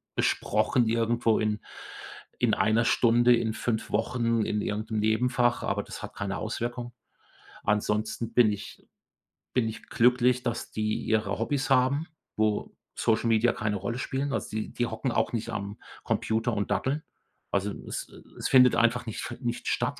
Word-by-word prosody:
besprochen 120 -3 +1
irgendwo 115 0 +2
in 105 -1 0 0.8
in - - +2
1 115 +2 +2
Stunde, 120 +1 +5
in 110 -2 -1
5 110 0 -2
Wochen, 115 0 +1
in 105 0 -1
irgend 105 +2 -3
'nem 110 - 0
Nebenfach, 120 +3 +2
aber - - -1
das - - -9
hat - - -8
keine 100 -1 -3
Auswirkung. 120 +2 -4 0.7
Ansonsten 110 +2 -1
bin 115 -4 +5
ich 105 - -8 0.7
bin 120 -3 +2
ich 110 - -6
glücklich, 125 +1 +3
dass 120 -2 -3
die 110 0 -1
ihre 110 -3 0
Hobbys 135 +4 -1
haben, 135 +4 +3 0.3
wo 110 -1 0 0.2
Social 115 +1 +1
Media 115 +1 +3
keine 105 -1 -1
Rolle 100 +6 -3
spielen. 135 +2 -2
Also, - - -2
die 110 0 -3
die 120 - 0
hocken 120 +3 -2
auch - - 0
nicht 115 0 -2
am 100 -1 -4 0.3
Computer 115 +1 0
und 100 0 -2
daddeln. 130 +9 0 0.5
Also, 100 +1 0 0.2
es - - -4 0.3
es - - -2
findet 125 -2 +7
einfach 120 0 +2
nicht 110 - -4
fe 120 - -6
nicht 120 -1 -3
statt, - - 0
115 Hz, 160 wpm, -28 LUFS, 110-120 Hz, 0.8 s, findet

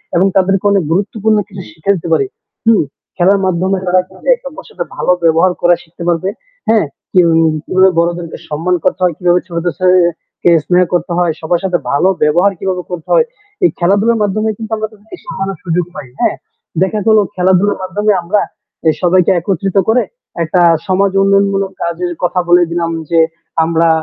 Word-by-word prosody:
এবং 185 +3 +4
তাদেরকে 195 +1 +2
অনেক 195 -4 +2
গুরুত্বপূর্ণ 210 +3 +1
কিছু 195 -2 -9
শিক্ষা 165 +5 -1
দিতে 170 0 -6
পারি। 410 - +2 0.4
হুম, 225 -7 +5 0.3
খেলার 195 +3 +3
মাধ্যমে 185 +2 0
তারা 180 0 +3
কিন্তু 190 - -18
একে - - -8
অপরের - - -12
সাথে - - -5
ভালো - - +1
ব্যবহার 165 +3 +4
করা 175 0 +4
শিখতে 170 +1 -11
পারবে। 175 +3 0 0.4
হ্যাঁ? 220 -7 +3 0.4
এবং 165 -1 +3 0.3
কিভাবে 190 +1 +3
বড়দেরকে 170 -1 -2
সম্মান 165 +5 0
করতে - - 0
হয়, 175 -2 +2
কিভাবে 180 0 +2
ছোটদের 170 0 -2
সেহে 185 0 +4 0.4
সে 175 - +4 0.2
স্নেহ 180 0 +3
করতে 175 0 -1
হয়, 175 -2 +2
সবার 165 +1 0
সাথে 180 -2 +1
ভালো 145 +7 +3
ব্যবহার 175 +7 +3
কিভাবে 185 -2 -2
করতে 170 -3 -6
হয়। 485 -1 +4 0.4
এই 355 - +6
খেলাধুলার 205 +5 +2
মাধ্যমে 215 +2 0
কিন্তু 225 -1 -8
আমরা 215 0 -3
তাদেরকে 215 - -13
শিখানোর 195 - -4
সুযোগ 175 -1 0
পাই 145 -3 -8
হ্যাঁ? - - +1 0.5
দেখা 200 +3 +1
গেল 220 - +5 0.2
খেলাধুলার 190 +2 +2
মাধ্যমে 205 +3 0
আমরা 200 +4 +1 0.6
সবাইকে 180 0 +3
একত্রিত 195 +2 -2
করে 240 +2 +3 0.4
একটা 175 +3 +1 0.3
সমাজ 190 +1 +2
উন্নয়নমূলক 195 0 +2
কাজের 175 +1 -2
কথা 180 +1 +1
বলে 175 0 +6
দিলাম 170 -1 -1 0.2
যে 165 -1 +3 0.4
আমরা 165 0 +2
185 Hz, 170 wpm, -14 LUFS, 175-200 Hz, 0.6 s, এই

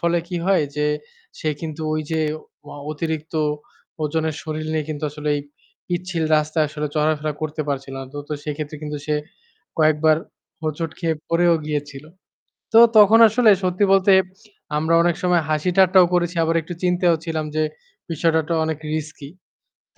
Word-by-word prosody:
ফলে 170 0 +2
কি 180 - -3
হয় 190 -6 +3
যে 150 0 +1 0.5
সে 155 - -1
কিন্তু 160 -1 -6
ওই 155 - -1
যে 160 0 0 0.5
অ - - -9 0.2
অতিরিক্ত 160 0 -4 0.7
ওজনের 160 0 -1
শরীর 155 0 -4
নিয়ে 155 -1 -1
কিন্তু 150 0 -6
আসলে 150 0 -5
এই - - -2 0.5
পিচ্ছিল 175 -1 -2
রাস্তায় 155 +1 +1
আসলে 150 0 -4
চলাফেরা 150 0 +1
করতে 155 0 -2
পারছিল 135 -1 -3
না। 135 - -5
তো, - - -5
তো - - -4
সেক্ষেত্রে 150 0 -5
কিন্তু 150 -1 -4
সে 150 - 0 0.6
কয়েকবার 155 0 +4 0.5
হোঁচট 155 +1 -3
খেয়ে 165 -2 0
পড়েও 170 0 +3
গিয়েছিল। 145 -1 -4 0.7
তো 225 - +8 0.2
তখন 215 +2 +7
আসলে 225 0 +4
সত্যি 185 +2 +2
বলতে 195 0 +4 0.7
আমরা 160 +2 0
অনেক 175 -1 +2
সময় 180 -1 +3
হাসি 155 +3 0
ঠাট্টাও 185 -1 +6
করেছি। 175 0 +1
আবার 165 +1 0
একটু 175 +3 -7
চিন্তাও 180 -1 +3
ছিলাম 160 -2 -2
যে 155 - +2 0.5
বিষয়টা 160 0 +2
তো - - +1
অনেক 160 -2 -2 0.2
risky. 155 -2 -5 0.6
তো - - -41
160 Hz, 160 wpm, -21 LUFS, 150-175 Hz, 0.7 s, তো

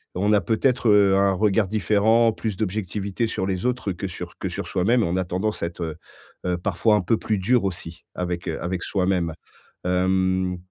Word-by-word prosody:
on 100 +3 +1
a 100 - +4
peut-être, 120 +5 +1
heu, 100 -2 +5
un 100 0 +3
regard 100 +1 +2
différent, 110 +2 +3
plus 110 -3 -3
d'objectivité 105 +1 -2
sur 95 - -2
les 95 +2 -2
autres 125 -5 -1
que 95 +2 -5
sur 90 - -8
que - - -3
sur - - -5
soi-même, 110 +6 +2
on 85 +2 0
a 95 - +1
tendance 95 +4 -2
à - - +1
être, 85 +1 -10
heu 80 -2 -4 0.5
heu, 90 -1 0
parfois 105 +4 +2
un 105 - +2
peu 110 +5 +1
plus 110 -2 -1
dur 115 +4 +2
aussi 85 -3 -5
avec, 90 0 -3
heu, 80 - -3
avec 90 0 -3
soi-même. 90 -4 0 0.5
Hem, 95 0 +1
95 Hz, 195 wpm, -23 LUFS, 90-110 Hz, 0.5 s, heu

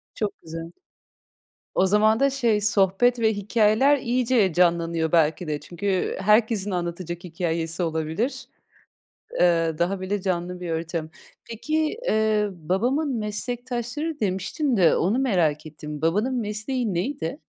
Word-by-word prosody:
Çok 210 -2 -3
güzel. 165 +1 -7 1.0
O 190 - +3
zaman 215 +4 +3
da 275 - +4
şey, 235 -6 +1
sohbet 205 +4 +3
ve 220 -1 +3
hikâyeler 215 +7 +3
iyice 240 -5 +1
canlanıyor 170 -2 +1
belki 160 +1 +2
de. 150 -2 -2
Çünkü 185 +4 -2
herkesin 210 0 +2
anlatacak 175 0 -4
hikâyesi 165 -1 -2
olabilir. 160 - -2 0.9
Eee, 165 -2 +3
daha 185 +3 -1
bile 195 +1 -2
canlı 180 -1 -2
bir 175 -2 -4
ortam. 160 -1 -3 0.4
Peki, 310 - -1
eee, 215 -1 +2
babamın 240 - -1
meslektaşları 245 +7 -3
demiştin 210 - -1
de, 175 -4 +5
onu 200 +9 +1
merak 175 - +1
ettim. 150 -1 -8
Babanın 210 +11 +1
mesleği 220 0 -2
neydi? 275 - -3
195 Hz, 125 wpm, -24 LUFS, 170-235 Hz, 1.0 s, de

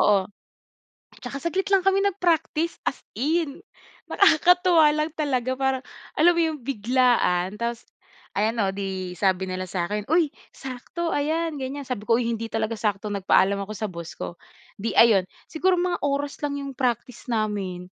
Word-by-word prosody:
Oo. 200 -2 +4 1.0
Tsaka 275 - -5
saglit 340 +6 -2
lang 390 -2 +3
kami 390 0 +4
nag-practice 340 -4 0
as - - -10 0.2
in. 310 +4 -1 0.5
Nakakatuwa 355 -3 +5
lang 305 +1 -1
talaga 260 -5 -1
parang 265 0 0 0.3
alam 345 +3 +6
mo 340 - +1
yung 315 -2 -1
biglaan? 240 -7 +2
Tapos, 235 0 -3 0.5
ayan 220 +3 0
o 190 - -1
di 190 -2 -4
sabi 190 +1 +1
nila 185 0 -4
sakin, 200 +5 -3
uy 320 -2 +3 0.2
sakto 270 +6 -4
ayan 320 +3 0
ganyan 275 +2 -5
sabi 250 -5 -4
ko 230 - +5
uy 245 - -1
hindi 225 0 -4
talaga 225 0 -1
sakto, 210 -1 -2
nagpaalam 200 0 +3
ako 205 +2 -5
sa 215 - -2
boss 170 -3 -8
ko. 170 - -7 0.4
Di 220 -2 -2
ayon 225 -4 +7 0.2
siguro 360 +3 +1
mga 355 0 0
oras 285 0 -2
lang 290 -1 -2
yung 275 -1 -5
practice 250 -1 -2
namin. 205 -5 -2
255 Hz, 155 wpm, -24 LUFS, 205-315 Hz, 1.0 s, ayon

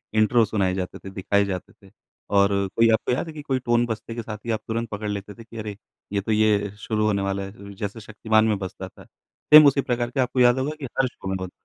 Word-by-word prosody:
Intro 110 +2 +4
सुनाए 100 -3 0
जाते 95 -1 -4
थे, 95 - -9
दिखाए 100 +2 +1
जाते 95 -2 -5
थे। 100 -1 -21 0.5
और 100 0 +5 0.3
कोई 115 0 +5
आपको 110 - 0
याद 125 - -1
है 160 - -8
कि 155 - -7
कोई 135 -3 -1
टोन 120 -1 +2
बजते 115 0 -5
के 120 - -3
साथ 105 -1 -7
ही 115 - -1
आप 110 - 0
तुरंत 115 0 -2
पकड़ 105 0 -4
लेते 105 0 -5
थे 115 - -13
कि 115 0 -13
अरे! 105 -2 -6 0.4
ये 100 - +1
तो 105 - -3
ये 105 -1 +2
शुरू 110 0 -1
होने 100 -2 +1
वाला 100 0 -2
है? 95 - -7
ल 100 0 -14
र 100 - -9
जैसे 105 +2 -4
शक्तिमान 110 0 +1
में 110 -2 +1
बजता 95 0 -6
था। - - -16 0.5
सेम 155 0 +12
उसी 140 0 +3
प्रकार 120 -2 -1
का 130 -1 +1
आपको 125 +1 -3
याद 120 +1 +5
होगा 145 +4 -2
कि 140 - -5
हर 135 - +4
शो 110 - -10
में 95 - -1
होता। 95 -1 -5
110 Hz, 270 wpm, -24 LUFS, 100-120 Hz, 0.5 s, सेम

